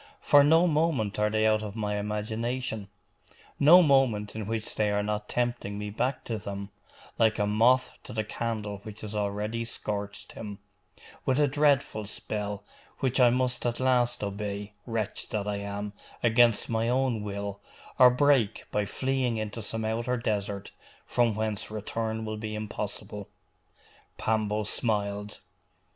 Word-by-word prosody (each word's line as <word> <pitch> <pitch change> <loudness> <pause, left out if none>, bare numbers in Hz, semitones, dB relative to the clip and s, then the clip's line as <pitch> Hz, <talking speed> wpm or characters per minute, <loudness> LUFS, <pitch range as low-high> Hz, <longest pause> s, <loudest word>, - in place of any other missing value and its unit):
for 145 0 +6
no 165 +4 +5
moment 150 - +1
are 105 0 +3
they 110 0 +1
out 110 0 +3
of 105 -1 -6
my 105 -2 -1
imagination, 110 +2 -3 0.7
no 170 +6 +8
moment 125 -9 +3
in 110 -2 -4
which 110 -1 -3
they 105 -1 +1
are 105 0 +1
not 105 0 -3
tempting 120 -4 -1
me 105 0 -4
back 130 +6 -1
to 110 -2 -3
them, 100 0 -6 0.5
like 110 -2 +4
a 105 - +2
moth 115 +5 +4
to - - -10
the 110 0 -1
candle 105 -2 -3
which 105 0 -10
has 110 0 -6
already 105 +3 -1
scorched 105 -3 -3
him, 105 -2 -7 0.7
with 130 - +1
a 145 - +5
dreadful 140 -6 +2
spell, 105 -1 -4 0.3
which 130 0 0
I 125 -1 +7
must 125 0 0
at 120 -1 -1
last 125 -3 +2
obey, 100 0 -4
wretch 110 -3 -3
that 105 -1 -2
I 105 -1 -1
am, 100 0 -4 0.3
against 115 -1 +4
my 115 0 0
own 125 -3 +1
will, 100 -1 -4 0.4
or 125 -1 +10
break 125 -4 +3
by 105 -1 0
fleeing 130 0 0
into 110 +1 -4
some 110 +1 -3
outer 115 +3 0
desert, 100 -3 -2 0.3
from 120 -3 +2
whence 110 -1 -2
return 110 +1 -3
will 110 0 -4
be 110 0 -4
impossible!' 105 -1 -5 0.9
Pambo 110 -1 0
smiled. 105 -1 -1
110 Hz, 155 wpm, -28 LUFS, 105-120 Hz, 0.9 s, or